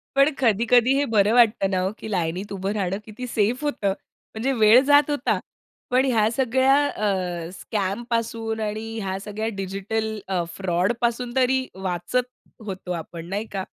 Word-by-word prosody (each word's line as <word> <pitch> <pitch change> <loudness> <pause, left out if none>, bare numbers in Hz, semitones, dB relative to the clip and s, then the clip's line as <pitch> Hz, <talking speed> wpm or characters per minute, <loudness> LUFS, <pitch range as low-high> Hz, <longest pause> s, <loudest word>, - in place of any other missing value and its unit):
पण 275 +2 +5
कधी-कधी 240 +1 +4
हे 285 - +2
बरं 215 -3 +3
वाटतं 230 -5 +4
ना, 190 -1 0
हो 185 +1 0
की - - -7
लाईनीत 180 +2 -2
उभं 195 0 -2
राहणं 195 -2 -1
किती 225 +4 -7
सेफ 230 +4 0
होतं. 210 -10 0 0.4
म्हणजे 240 +5 0
वेळ 225 +1 +6
जात 290 +1 +5
होता. 290 -1 0 0.5
पण 255 +2 +4
ह्या 225 -5 +3
सगळ्या 260 +2 +3
अ, 180 -7 -2
स्कॅमपासून 225 +2 -2
आणि 215 +1 -3
ह्या 190 -2 -3
सगळ्या 215 +1 -3
डिजिटल 210 +3 -3
अ, 185 -2 0
फ्रॉडपासून 235 +7 -1
तरी 260 0 +2
वाचत 190 +6 -2 0.4
होतो 190 -2 -6
आपण 165 -1 -6
नाही 205 +3 -2
का? 195 -1 -3
220 Hz, 155 wpm, -24 LUFS, 190-245 Hz, 0.5 s, वेळ